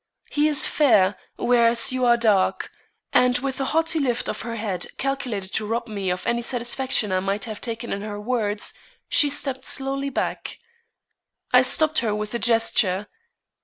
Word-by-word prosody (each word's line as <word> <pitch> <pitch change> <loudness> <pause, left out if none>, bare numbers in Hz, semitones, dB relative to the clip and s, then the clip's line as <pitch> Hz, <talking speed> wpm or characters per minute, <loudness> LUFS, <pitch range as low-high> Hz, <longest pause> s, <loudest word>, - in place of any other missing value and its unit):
He 295 +1 +2
is 295 -3 +3
fair, 210 -10 +3 0.2
whereas 235 -1 +2
you 255 -1 0
are 235 0 +5
dark." 210 -5 +1 0.4
And 250 0 +4
with 270 0 -4
a 270 - 0
haughty 325 +2 +1
lift 245 -4 -1
of - - -4
her 230 0 -5
head 205 -5 -3
calculated 250 -8 -3
to 215 - -1
rob 235 +2 -2
me 200 -4 -3
of 180 0 -3
any 235 0 0
satisfaction 240 -2 -1
I 185 - +2
might 195 +4 -2
have 215 -2 -7
taken 230 0 -4
in 200 - -4
her 205 0 -6
words, 210 -2 -1 0.4
she 290 - +4
stepped 265 -2 -2
slowly 275 +1 -2
back. 275 - -3 1.0
I - - +8
stopped 315 0 +3
her 215 -3 -1
with 210 +1 -4
a 235 - -1
gesture. 215 -4 +1
235 Hz, 170 wpm, -23 LUFS, 210-265 Hz, 1.0 s, I